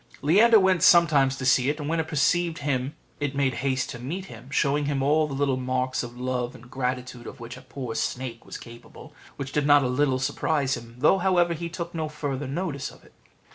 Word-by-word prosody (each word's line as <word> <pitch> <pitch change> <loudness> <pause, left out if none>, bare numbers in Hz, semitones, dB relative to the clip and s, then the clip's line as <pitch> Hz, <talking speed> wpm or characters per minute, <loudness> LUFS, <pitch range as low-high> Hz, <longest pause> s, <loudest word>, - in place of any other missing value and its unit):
Leander 215 +9 +6
went 190 -3 +3
sometimes 155 -7 +5
to 135 - -5
see 130 +1 +4
it, 150 +2 -2
and 145 - -4
when 165 +1 0
it 160 - -1
perceived 165 +3 +1
him 140 -1 -2 0.2
it 145 -1 -2
made 135 -2 +1
haste 130 -1 -1
to 125 - -8
meet 170 +10 -5
him, 120 - -12
showing 145 0 +1
him 140 -2 -1
all 150 +2 +3
the 140 - -5
little 135 -2 +1
marks 130 0 -1
of 120 0 -8
love 125 -1 -2
and 120 +2 -15
gratitude 125 -2 -4
of - - -10
which 120 +1 -8
a 125 - -12
poor 130 -2 -6
snake 120 0 -3
was - - -8
capable, 120 0 -13 0.2
which 135 -1 -6
did 145 -1 0
not 145 -1 +6
a - - +1
little 130 +1 +1
surprise 140 +1 0
him, 115 -1 -11
though, 150 +9 +4
however, 175 -2 +2
he 170 +1 -5
took 170 0 -6
no 160 -2 -3
further 145 -2 -4
notice 140 -1 -3
of - - -17
it. - - -21
140 Hz, 220 wpm, -25 LUFS, 130-155 Hz, 0.2 s, Leander